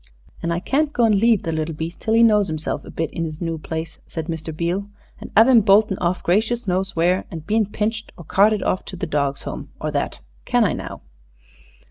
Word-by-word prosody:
"An' 170 - -1
I 170 - 0
can't 290 - 0
go 240 -5 +2
and 220 - +4
leave 220 +1 +3
the 165 - -2
little 160 0 -2
beast 160 +2 -6
till 220 - +1
he 230 - +6
knows 210 -3 +4
'imself 155 0 -3
a - - -11
bit 165 -1 -3
in 165 - -3
'is 155 -1 -5
noo 165 -2 -3
place," 160 +1 -5
said 160 -2 -5
Mr. 160 -1 -5
Beale, 175 +5 -2 0.3
"an' - - -9
'ave 225 +4 +7
'im 235 -3 +7
boltin' 200 -1 +4
off 175 0 -1
gracious 220 +6 +1
knows 190 +1 0
where, 175 +3 +2
and 160 -3 -8
being 215 +2 +1
pinched 220 +2 -3
or 170 - -10
carted 205 +5 +3
off 185 - 0
to - - -7
the 180 +1 -3
Dogs' 140 -3 -1
Home, - - -6
or - - -2
that. - - -2 0.2
Can - - +2
I, - - +1
now?" - - -7
185 Hz, 225 wpm, -21 LUFS, 165-215 Hz, 0.3 s, ave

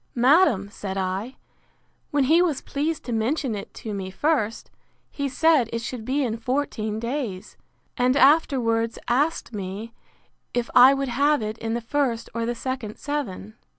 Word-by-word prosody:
—Madam, 250 - +4
said 195 -2 -5
I, 190 +6 -3 0.7
when 290 -1 +2
he 320 +6 +5
was 325 -7 0
pleased 300 +2 -2
to 245 - -4
mention 235 +3 0
it 200 -1 -6
to 220 - -6
me 190 -2 -4
first, 230 0 -1 0.4
he 280 -1 -2
said 285 -3 +3
it 230 0 -3
should 235 -2 -5
be 275 +3 0
in 230 -3 -2
fourteen 230 -4 -2
days; 235 -6 -4 0.4
and 255 +1 +2
afterwards, 250 -6 +3
asked 275 +1 0
me 205 +3 -6 0.6
if 240 -1 -1
I 255 +2 +8
would 275 -1 -2
have 280 +1 +2
it 215 +1 -4
in 225 0 -2
the 235 - -2
first 235 -1 -1
or 230 0 -2
the 240 - -1
second 255 -4 -5
seven? 230 -7 -5
240 Hz, 160 wpm, -24 LUFS, 220-280 Hz, 0.7 s, I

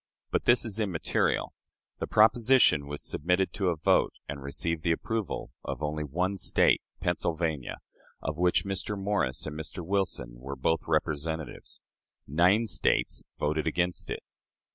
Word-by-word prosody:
But - - 0
this 120 0 +5
is 110 -1 -3
immaterial. 95 -7 0 0.5
The - - -2
proposition 110 - +5
was 75 0 -4
submitted 90 +4 0
to 95 -2 -1
a 85 - +1
vote, 80 - +2
and 70 -1 -5
received 80 +4 -2
the 85 +1 +1
approval 110 +5 -2
of - - -5
only 75 +1 -1
one 90 +7 -1
State - - +4 0.2
Pennsylvania, 80 -5 -1 0.4
of 75 - -3
which 90 +3 +2
Mr. 100 +1 -1
Morris 100 -10 -1
and 75 - -5
Mr. 80 +2 -5
Wilson 80 -11 -2
were 70 +2 -6
both 75 +4 0
representatives. 80 0 -2 0.4
Nine 90 - +3
States 110 - +1 0.2
voted 75 0 0
against 90 +1 -1
it. - - -4
85 Hz, 140 wpm, -29 LUFS, 75-95 Hz, 0.5 s, this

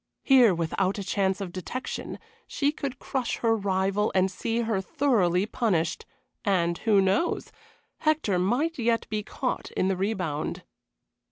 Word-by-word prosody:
Here, 250 -8 +6
without 185 +4 0
a 200 - -3
chance 190 0 0
of 185 -3 -4
detection, 190 +8 -5 0.3
she 285 0 0
could 280 -4 -5
crush 260 -2 -2
her 225 -1 +2
rival 195 0 0
and 190 0 +3
see 230 +4 -1
her 220 -4 0
thoroughly 200 - +2
punished, 210 -9 -1 0.4
and 175 -4 +2
who 210 -3 +4
knows? 195 - 0 0.5
Hector 305 - +1
might 255 - 0
yet 230 -1 +1
be 215 -1 -1
caught 250 +4 -3
in 185 - 0
the 195 - +1
rebound. 180 -6 -2
205 Hz, 145 wpm, -27 LUFS, 185-245 Hz, 0.5 s, Here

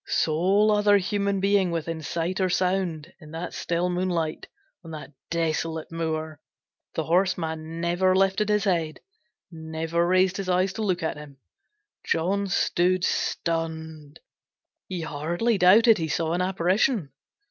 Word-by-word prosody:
Sole 190 +7 +2
other 205 -1 +4
human 200 0 -1
being 195 -1 +2
within 165 -1 -3
sight 170 +5 -2
or 185 - +2
sound 180 -3 -1
in 155 -3 -13
that 165 +2 -5
still 175 +1 -1
moonlight, 175 -3 -2 0.4
on 165 - -11
that 155 -1 -9 0.2
desolate 160 -1 -2
moor, 160 -2 -3 0.6
the 160 - -1
horseman 165 -2 -1
never 175 +2 +2
lifted 195 +2 +2
his 210 -1 +2
head, 170 -6 -1 0.5
never 160 +1 -2
raised 185 +1 +3
his 195 -2 -4
eyes 185 +1 +1
to 225 - -5
look 185 -5 -1
at 160 - -2
him. 145 -2 -11 0.7
John 195 +5 0
stood 185 -1 +1
stunned. 160 -4 -3 0.7
He 180 -2 -4
hardly 170 +9 -1
doubted 210 +4 +6
he 160 - -1
saw 160 +1 -1
an 175 - 0
apparition. 185 - +1
175 Hz, 135 wpm, -25 LUFS, 160-190 Hz, 0.7 s, doubted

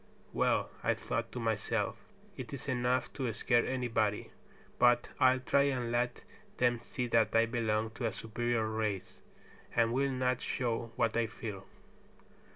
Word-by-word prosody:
"Well," - - +1
I - - +2
thought - - -3
to 125 - -5
myself, 110 -1 0 0.4
"it - - -7
is 140 - -6
enough 125 -1 0
to 130 -4 -2
scare 120 +2 +2
anybody; 115 -5 0 0.5
but 120 0 +4
I'll 130 0 +5
try 140 +2 +3
and 125 -3 -2
let 120 0 0 0.4
them 120 -1 +2
see 125 +2 -4
that 115 -1 +3
I 115 0 +6
belong 110 -2 0
to 115 +1 -2
a - - -1
superior 115 0 -1
race, 110 -3 -3 0.5
and 115 0 +3
will 135 +2 +2
not 125 -1 0
show 115 -2 -2
what 115 0 +1
I 115 -1 +2
feel." 105 -4 -7
120 Hz, 155 wpm, -32 LUFS, 110-125 Hz, 0.5 s, I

